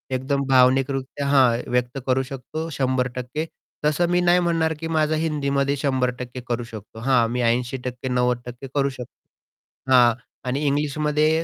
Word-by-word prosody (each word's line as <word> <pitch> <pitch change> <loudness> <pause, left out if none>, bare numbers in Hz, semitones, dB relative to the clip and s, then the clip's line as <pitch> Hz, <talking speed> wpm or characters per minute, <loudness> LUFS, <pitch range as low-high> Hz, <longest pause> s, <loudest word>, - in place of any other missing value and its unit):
एकदम 140 +2 -1
भावनिकरित्या 135 +1 +2
हां, 130 -4 +4
व्यक्त 125 +1 0
करू 130 +1 +2
शकतो 135 +5 -6
100% 130 +2 -1 0.4
तसं 155 +3 +2
मी 175 0 +3
नाही 175 0 +4
म्हणणार, 165 -2 +1
की 165 - -4
माझा 155 -1 +1
हिंदीमध्ये 140 -3 0
100% 125 -2 -2
करू 120 0 -1
शकतो. 110 -1 -10
हां, 120 -1 +3
मी 125 +1 -1
80% 125 +2 -1
90% 125 +1 -1
करू 140 -1 +2
शकतो. 125 -3 -9 0.8
हां 120 -2 +6 0.3
आणि 130 +2 0
इंग्लिशमध्ये 150 +2 +1
135 Hz, 135 wpm, -23 LUFS, 125-150 Hz, 0.8 s, हां